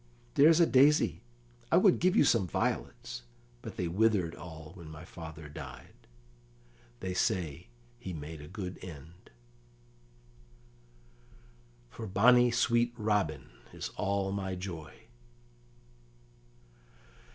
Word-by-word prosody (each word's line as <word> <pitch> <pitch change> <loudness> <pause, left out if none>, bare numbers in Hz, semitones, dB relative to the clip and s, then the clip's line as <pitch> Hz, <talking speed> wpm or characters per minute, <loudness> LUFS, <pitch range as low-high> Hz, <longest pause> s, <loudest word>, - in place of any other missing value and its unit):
There's 160 +3 +6
a 170 - +7
daisy; 145 +1 +4 0.5
I - - +6
would - - +5
give 185 +3 +3
you - - +6
some 115 -9 +3
violets, - - -2 0.4
but - - -8
they 90 - -1
withered 95 -2 +2
all 80 -3 -10
when 85 -4 -11
my 80 +2 -10
father 80 -3 -9
died; 70 -4 -10 1.1
they 95 - -3
say 90 - -1 0.3
he 95 - -6
made 80 -1 -7
a 75 - -10
good 90 +1 -6
end, 85 +1 -11 2.6
For 110 - -7
bonny 120 +6 +5
sweet 120 0 +2
Robin 100 - -1 0.2
is - - -5
all 100 -1 0
my 95 -1 -3
joy." 85 -4 -7
95 Hz, 110 wpm, -31 LUFS, 80-110 Hz, 2.6 s, a